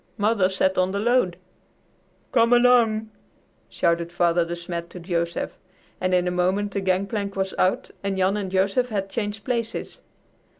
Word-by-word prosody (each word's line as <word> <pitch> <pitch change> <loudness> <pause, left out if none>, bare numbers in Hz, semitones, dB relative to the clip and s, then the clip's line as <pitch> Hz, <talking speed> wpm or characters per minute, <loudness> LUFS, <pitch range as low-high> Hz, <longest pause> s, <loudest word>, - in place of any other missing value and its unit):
Mother 205 -3 +2
sat 190 0 +1
on 185 +1 +1
the 200 - -1
load." 225 -6 +2 0.9
"Come 230 -1 +4
along!" 235 -3 +4 0.6
shouted 170 0 0
Father 175 0 +2
De 170 +1 -4
Smet 170 0 -5
to 180 - -9
Joseph, 170 -1 -3 0.4
and 185 0 0
in 180 0 +2
a - - 0
moment 185 +3 0
the 200 - -2
gangplank 195 +2 -1
was 190 -1 -2
out 185 - +1
and 195 -1 -1
Jan 190 +1 +2
and 200 -2 -3
Joseph 195 +6 +1
had 195 -3 -3
changed 205 -2 -3
places. 230 -1 -3
195 Hz, 160 wpm, -24 LUFS, 180-215 Hz, 0.9 s, Come